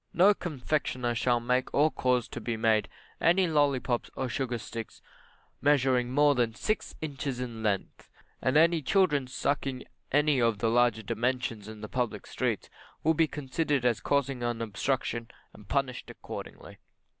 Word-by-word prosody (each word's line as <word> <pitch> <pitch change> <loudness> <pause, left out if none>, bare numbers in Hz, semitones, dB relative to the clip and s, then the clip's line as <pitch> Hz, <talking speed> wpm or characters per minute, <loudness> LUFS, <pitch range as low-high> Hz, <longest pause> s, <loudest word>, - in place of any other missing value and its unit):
No 190 +5 +6
confectioner 140 -7 -2
shall 120 +1 +2
make 125 +2 0
or 150 +2 +4
cause 125 -3 +1
to - - -6
be 115 -2 -2
made, 110 -2 +2 0.3
any 180 +3 +4
lollipops 140 -6 +1
or 130 - -2
sugar 125 0 -2
sticks 115 0 -7 0.6
measuring 130 -4 +3
more 145 +2 +5
than 120 -4 0
six 215 - -2
inches 140 -4 -4
in 120 -3 -5
length, 105 -3 -2 0.3
and 130 +3 +2
any 165 +1 +5
children 150 -4 +2
sucking 135 0 -2 0.3
any 145 -2 +3
of 115 -3 +1
larger 115 -1 +3
dimensions 115 -1 -2
in 110 -1 -9
the 105 - -5
public 125 -1 -2
streets - - -2 0.4
will 160 - +4
be 160 0 +3
considered 145 -1 -1
as 120 -3 +2
causing 140 -3 0
an 120 -1 -1
obstruction, 115 +1 -2 0.2
and 105 - -15
punished 135 0 -1
accordingly. - - -9
125 Hz, 150 wpm, -29 LUFS, 115-145 Hz, 0.6 s, No